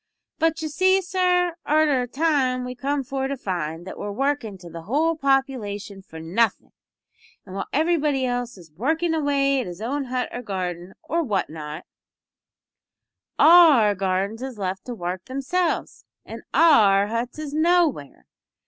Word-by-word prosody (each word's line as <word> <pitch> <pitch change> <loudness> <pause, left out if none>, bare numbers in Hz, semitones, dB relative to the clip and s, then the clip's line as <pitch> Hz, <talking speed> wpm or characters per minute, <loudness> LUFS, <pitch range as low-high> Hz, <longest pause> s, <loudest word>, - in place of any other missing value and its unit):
But 325 0 +1
you - - -1
see, 375 +5 +3
sir, 360 -1 +1
arter 300 -3 +2
a 245 - -3
time 260 -3 0
we 250 - -5
come 275 +3 -2
for 270 0 -3
to 275 0 -4
find 170 -6 -4
that 190 - -8
we're 205 - -4
workin' 265 -3 -2
to 180 -1 -13
the 165 0 -8
whole 300 - 0
population 255 -9 -1
for 160 -4 -12
nothin', 185 +9 0 0.7
and 185 - -11
while 195 - -4
everybody 300 -3 +1
else 245 -2 -3
is 170 -4 -15
working 320 - -1
away 280 -3 +1
at 240 - -6
his 175 0 -8
own 270 +6 -2
hut 255 0 -2
or 245 - -5
garden, 185 -4 -5
or 335 +1 -1
what 210 - -1
not, 155 +1 -7 1.5
our 310 -11 +7
gardens 195 +3 -2
is 260 -3 -6
left 190 -1 -4
to 245 - -5
work 180 -1 -5
themselves, 280 +7 -2 0.2
an' - - -8
our 210 -12 +5
huts 230 +5 -4
is 305 -2 -6
nowhere! 315 - +1
255 Hz, 155 wpm, -23 LUFS, 195-305 Hz, 1.5 s, our